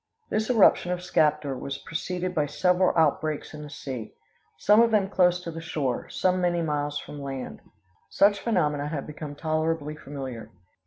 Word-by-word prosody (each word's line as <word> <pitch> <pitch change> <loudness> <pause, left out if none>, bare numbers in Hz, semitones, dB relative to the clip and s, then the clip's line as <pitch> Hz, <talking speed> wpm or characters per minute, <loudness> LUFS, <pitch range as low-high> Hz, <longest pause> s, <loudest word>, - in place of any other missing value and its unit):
This 220 +2 0
eruption 210 -6 +5
of 180 0 -2
Skaptar 150 -5 +1
was 135 +2 -5
preceded 180 +2 -4
by 150 -4 +1
several 180 +3 +2
outbreaks 155 -1 +1
in 150 - -8
the 150 - -8
sea; 130 -7 -7 0.4
some 210 +9 +5
of 235 - +5
them 210 -3 +2
close 180 -2 +3
to 170 - -5
the 165 0 -7
shore; 145 -6 -2
some 185 0 +1
many 175 -1 +1
miles 145 -1 -1
from 145 0 -8
land. 135 -2 -6 0.5
Such 200 0 +4
phenomena 150 -10 0
have 150 -2 -4
become 150 -1 -7
tolerably 155 -1 -1
familiar. 130 -6 -7
155 Hz, 165 wpm, -26 LUFS, 145-180 Hz, 0.5 s, eruption